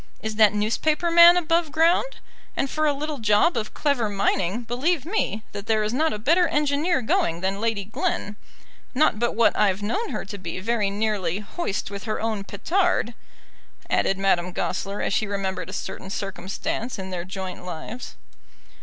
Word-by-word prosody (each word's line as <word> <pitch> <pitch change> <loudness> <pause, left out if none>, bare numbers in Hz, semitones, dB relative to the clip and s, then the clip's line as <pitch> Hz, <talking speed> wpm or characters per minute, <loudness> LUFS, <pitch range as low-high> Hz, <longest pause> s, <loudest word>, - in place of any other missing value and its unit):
Is 220 0 -2
that 215 -2 +5
newspaper 300 +11 +1
man 340 +1 +9
above 330 -2 +1
ground? 335 +10 +2 0.4
And 270 - 0
for 310 0 +1
a - - +4
little 290 0 -4
job 210 +10 +3
of 215 -2 -3
clever 270 -7 +1
mining, 200 +2 0
believe 270 +6 0
me, 335 - -1
that 205 +1 -7
there 220 -1 +2
is 210 +2 -2
not 315 +5 +2
a - - -3
better 335 - +3
engineer 295 0 +1
going 170 -6 +1
than 195 +2 -1
Lady 225 -3 -1
Glen; 205 0 -2 0.6
not 260 -6 +3
but 235 -1 0
what 230 0 +4
I've 200 -1 +2
known 415 - -1
her - - -4
to 200 +1 -8
be 175 0 -5
very 215 0 0
nearly 200 -4 -1
'hoist 205 - -4
with 200 -1 -6
her 215 - -2
own 220 -3 -2
petard,'" 325 - 0 0.8
added 195 - +2
Madame 180 -2 +1
Goesler, 200 +2 -2
as - - -1
she 215 - +1
remembered 190 -3 -3
a - - -6
certain 190 - -6
circumstance 195 +5 -4
in 190 -1 -6
their 175 -2 -3
joint 185 0 -6
lives. 180 +8 -7
215 Hz, 175 wpm, -24 LUFS, 195-295 Hz, 0.8 s, man